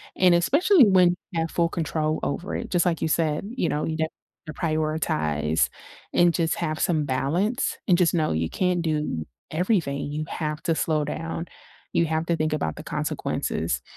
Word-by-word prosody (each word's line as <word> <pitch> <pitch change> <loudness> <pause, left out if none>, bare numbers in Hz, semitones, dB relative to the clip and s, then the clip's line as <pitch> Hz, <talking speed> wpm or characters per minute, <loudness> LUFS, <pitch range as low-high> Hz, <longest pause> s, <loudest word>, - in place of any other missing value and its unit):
And 180 -2 +5
especially 290 - +5
when 185 -2 +6 0.2
you 170 - -1
have 165 - -2
full 170 -1 +1
control 155 -2 -1
over 175 +6 -3
it, - - -4
just 175 -1 +2
like 170 -2 0
you - - +1
said, 155 -1 +1
you - - 0
know, 150 - -1
you 160 0 -2
d 160 - +1 0.5
prioritize 145 - 0 0.4
and 175 -1 +4
just 165 -2 +1
have 155 -2 -2
some 155 -4 +1
balance 165 - 0
and 180 -1 +4
just 175 - +3
know 155 -2 +1
you 80 +1 0
can't 180 -2 0
do 150 - -1 0.3
everything; 155 -5 0
you 155 +1 -3
have 150 0 -3
to 165 - +1
slow 155 -1 +1
down, 165 +2 -4 0.5
you 170 - +3
have 160 +1 -1
to 170 0 +1
think 155 -1 0
about 80 - -1
the - - -9
consequences, 75 -6 -2
160 Hz, 180 wpm, -25 LUFS, 150-175 Hz, 0.5 s, when